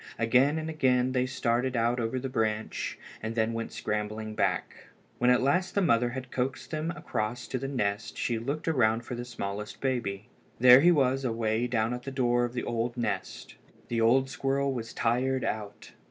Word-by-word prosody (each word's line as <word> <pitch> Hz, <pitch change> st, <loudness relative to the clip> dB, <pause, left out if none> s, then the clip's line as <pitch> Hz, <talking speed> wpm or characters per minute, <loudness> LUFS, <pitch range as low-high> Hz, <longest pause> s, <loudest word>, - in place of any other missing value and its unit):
Again 125 Hz, +7 st, +3 dB
and 160 Hz, 0 st, -3 dB
again 130 Hz, -5 st, +2 dB
they 130 Hz, 0 st, +1 dB
started 125 Hz, 0 st, 0 dB
out 120 Hz, +2 st, +1 dB
over 115 Hz, +2 st, -1 dB
the 135 Hz, -, -3 dB
branch, 110 Hz, -3 st, -2 dB, 0.2 s
and 110 Hz, +1 st, -4 dB
then 110 Hz, 0 st, +1 dB
went 115 Hz, 0 st, -4 dB
scrambling 110 Hz, +1 st, -3 dB
back. 95 Hz, -5 st, -2 dB, 0.3 s
When 125 Hz, -, +3 dB
at 125 Hz, 0 st, +4 dB
last 180 Hz, +7 st, +1 dB
the 200 Hz, -, +3 dB
mother 120 Hz, -6 st, +3 dB
had 130 Hz, +1 st, -6 dB
coaxed 130 Hz, +2 st, -3 dB
them 155 Hz, +1 st, -2 dB
across 120 Hz, -6 st, -3 dB
to 130 Hz, -, -2 dB
the 135 Hz, -, -3 dB
nest 105 Hz, -6 st, -2 dB
she 115 Hz, -2 st, -1 dB
looked 140 Hz, +8 st, -4 dB
around 120 Hz, -6 st, +2 dB
for 125 Hz, -, -6 dB
the 120 Hz, 0 st, -5 dB
smallest 105 Hz, -3 st, -5 dB
baby. 115 Hz, -7 st, -2 dB, 0.3 s
There 125 Hz, +2 st, +9 dB
he 175 Hz, +3 st, +6 dB
was 135 Hz, -4 st, +2 dB
away 115 Hz, -1 st, 0 dB
down 115 Hz, -1 st, 0 dB
at 125 Hz, -, -4 dB
the 135 Hz, -, -6 dB
door 120 Hz, -2 st, +2 dB
of 120 Hz, -, -6 dB
the 125 Hz, -, -3 dB
old 120 Hz, +1 st, -2 dB
nest. 120 Hz, -, -3 dB, 0.4 s
The 115 Hz, -1 st, 0 dB
old 130 Hz, +4 st, +4 dB
squirrel 135 Hz, +1 st, 0 dB
was 115 Hz, -3 st, -5 dB
tired 130 Hz, +3 st, 0 dB
out. 105 Hz, -1 st, -4 dB
120 Hz, 190 wpm, -29 LUFS, 115-130 Hz, 0.4 s, There